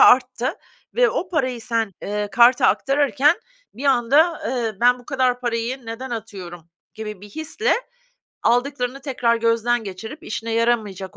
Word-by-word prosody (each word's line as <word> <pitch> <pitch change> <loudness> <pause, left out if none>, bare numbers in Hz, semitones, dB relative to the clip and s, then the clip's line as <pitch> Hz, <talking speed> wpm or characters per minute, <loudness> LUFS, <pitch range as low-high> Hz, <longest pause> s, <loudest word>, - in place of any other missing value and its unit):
arttı 250 0 +5 0.4
ve - - +4
o 365 - -2
parayı 260 -9 -1
sen, 225 -3 -1
eee, 210 0 -2
karta 245 +1 +6
aktarırken 285 +3 +3 0.4
bir 260 - -8
anda, 280 +6 +3
eee, 235 -4 -1
"Ben 245 +1 +5
bu 245 - -16
kadar 255 -3 +1
parayı 240 +1 -2
neden 245 +3 -6
atıyorum." 185 -7 -7 0.3
gibi 210 -3 -7
bir 205 - -11
hisle 315 - 0 0.7
aldıklarını 250 +1 0
tekrar 245 -4 +1
gözden 230 +1 +1
geçirip 210 +9 -8
işine 225 +1 -4
yaramayacak 220 -5 0
240 Hz, 140 wpm, -22 LUFS, 225-265 Hz, 0.7 s, karta